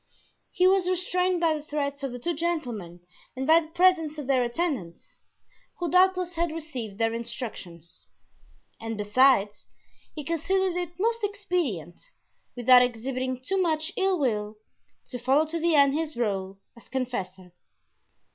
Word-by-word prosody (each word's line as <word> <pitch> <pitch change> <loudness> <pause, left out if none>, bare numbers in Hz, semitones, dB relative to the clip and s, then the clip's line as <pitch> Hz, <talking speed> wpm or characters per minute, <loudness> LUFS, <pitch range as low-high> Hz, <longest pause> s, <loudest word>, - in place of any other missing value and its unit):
He 365 - +1
was 375 -1 +3
restrained 365 0 0
by 330 -2 +3
the 300 - -5
threats 285 -1 -3
of 275 -2 -3
the 245 - -6
two 340 +8 -2
gentlemen 245 - -3 0.3
and 265 +1 -3
by 320 +3 +6
the 320 - -8
presence 330 -2 +2
of 295 - -5
their 260 -1 +2
attendants, 240 - -4 0.6
who 350 -1 -3
doubtless 365 -1 +3
had 340 -1 -1
received 265 -11 -6
their 225 0 +1
instructions. 225 - -7 0.7
And 225 -1 -5
besides, 210 0 +3 0.5
he 300 - -5
considered 350 +4 0
it 350 0 -4
most 460 +2 0
expedient, 355 - -2 0.5
without 250 0 +6
exhibiting 255 +1 -2
too 385 +7 0
much 315 -2 0
ill 385 -1 +1
will, 215 -7 -1 0.5
to 250 - -5
follow 270 +6 +3
to 330 +2 -4
the 335 0 +2
end 280 -1 +5
his 310 -2 -3
role 195 -4 -2 0.2
as 235 - -18
confessor. 190 -9 -4
280 Hz, 145 wpm, -26 LUFS, 235-345 Hz, 0.7 s, by